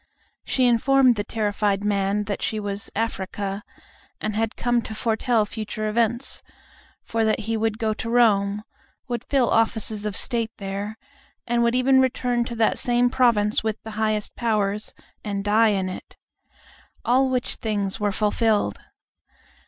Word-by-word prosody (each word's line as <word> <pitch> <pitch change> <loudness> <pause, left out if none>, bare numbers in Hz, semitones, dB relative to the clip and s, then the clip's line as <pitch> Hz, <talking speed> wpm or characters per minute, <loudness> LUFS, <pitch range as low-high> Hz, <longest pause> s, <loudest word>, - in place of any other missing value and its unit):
She 255 - +1
informed 250 +1 +4
the 205 - -2
terrified 205 -2 -1
man 200 0 +1
that 205 -1 -4
she 215 - -1
was 205 -1 -3
"Africa," 200 -2 -3 0.6
and 215 -1 -3
had 225 0 -1
come 240 -1 +1
to 220 - -6
foretell 225 0 +1
future 215 0 -4
events; 235 +3 0 0.6
for 225 0 -1
that 220 0 +1
he 225 +2 -2
would 220 -1 0
go 220 -2 0
to 230 - -5
Rome, 210 -4 +3 0.4
would 240 -2 -3
fill 265 -4 +1
offices 220 -2 +1
of 205 - -2
state 230 -3 +1
there, 200 +2 -5 0.5
and 240 0 +1
would 235 +1 +2
even 260 +1 +4
return 245 -2 0
to 235 - -5
that 225 -1 +2
same 245 0 +2
province 230 -6 +3
with 220 -1 -1
the 220 - -7
highest 215 -1 -1
powers, 210 -3 0 0.3
and 200 -1 -3
die 215 +2 +4
in 195 -3 +1
it. 185 - -8 0.9
All 260 +2 +3
which 250 -1 -1
things 205 -2 -2
were 205 -1 +1
fulfilled. 215 +1 +1
220 Hz, 150 wpm, -24 LUFS, 205-235 Hz, 0.9 s, informed